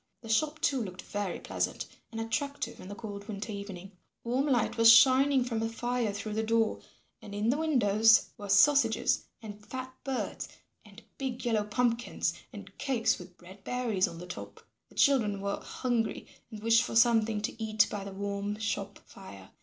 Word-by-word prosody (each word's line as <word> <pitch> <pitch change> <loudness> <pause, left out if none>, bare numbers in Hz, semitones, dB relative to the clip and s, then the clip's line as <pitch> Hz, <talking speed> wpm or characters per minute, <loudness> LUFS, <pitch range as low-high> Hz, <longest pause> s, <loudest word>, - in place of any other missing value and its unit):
The 225 - -9
shop, 305 +7 +1
too, 280 -6 +1
looked 185 -4 -7
very 205 -3 -4
pleasant - - -3 0.3
and 225 - -5
attractive 280 +6 -3
in - - -10
the 205 - -7
cold 205 -2 -8
winter 215 0 -5
evening. 200 -2 -7 0.3
Warm 255 +5 0
light 245 -6 +1
was 230 0 +8
shining 260 +3 +6
from 230 -3 -2
a 225 - -1
fire 240 -1 -1
through 205 +1 -5
the 220 - 0
door, 225 0 +1 0.4
and 205 -1 -9
in 210 +2 0
the 280 - 0
windows 225 -8 +4
were 205 -3 -9
sausages, 280 +9 +4 0.2
and 210 -1 -9
fat 255 +3 -7
birds, 270 -2 -3 0.3
and 210 +2 -15 0.2
big 260 -2 -4
yellow 225 -3 +1
pumpkins 235 +3 0 0.2
and - - -11
cakes 255 -5 +1
with 180 0 -13
red 185 +3 -14
berries 230 -5 0
on 170 - -9
the 175 - -8
top. 180 - -9 0.3
The - - -20
children 220 -8 +3
were 200 0 -2
hungry 240 -3 -2 0.2
and 215 -1 -9
wished 230 0 +5
for 245 - -4
something 225 -2 +4
to 220 +2 -4
eat 215 -1 +3
by 205 -2 -4
the 200 - -7
warm 200 +1 -3
shop 205 -2 -3
fire. 100 - -13
220 Hz, 180 wpm, -30 LUFS, 205-245 Hz, 0.4 s, was